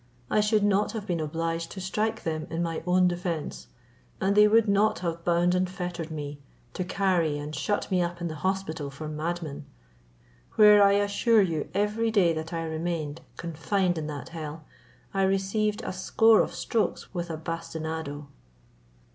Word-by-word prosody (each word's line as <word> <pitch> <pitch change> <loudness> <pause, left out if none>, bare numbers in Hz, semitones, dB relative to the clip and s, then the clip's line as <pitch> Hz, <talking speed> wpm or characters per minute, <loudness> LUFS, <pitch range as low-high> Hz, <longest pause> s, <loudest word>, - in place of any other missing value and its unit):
I - - +3
should 210 0 +2
not 205 +1 +2
have 220 -3 -4
been 175 -5 -1
obliged 165 +2 -2
to 195 - -7
strike 215 +4 -2
them 155 -1 -3
in 165 +1 -2
my 165 -1 -2
own 180 0 +4
defence, 175 -3 -3 0.5
and 195 +1 +1
they 210 0 +7
would 225 +1 +4
not 205 +2 +3
have 170 0 -3
bound 175 +1 +2
and 180 0 +1
fettered 175 -3 -5
me, 145 -2 -6 0.3
to 185 - -2
carry 175 -5 +1
and 145 +1 -6
shut 205 +8 -1
me 185 -1 +3
up 175 0 -2
in 175 - -2
the 160 - -4
hospital 185 -6 -2
for 140 +3 -7
madmen, 155 -2 -4 0.9
where 210 -1 +8
I 200 0 +6
assure 205 +2 +3
you 165 -5 -2
every 210 +3 +1
day 190 -6 +3
that 160 0 -5
I 165 -1 -2
remained 160 -2 -3 0.2
confined 175 +2 -1
in 150 - -4
that 150 +1 -6
hell, 155 -2 -7 0.5
I 195 - +1
received 195 +3 +1
a - - -3
score 220 +4 +4
of - - -3
strokes 225 -2 -1
with 175 -1 -3
a 160 - -3
bastinado." 160 -2 -5
175 Hz, 170 wpm, -27 LUFS, 160-200 Hz, 0.9 s, where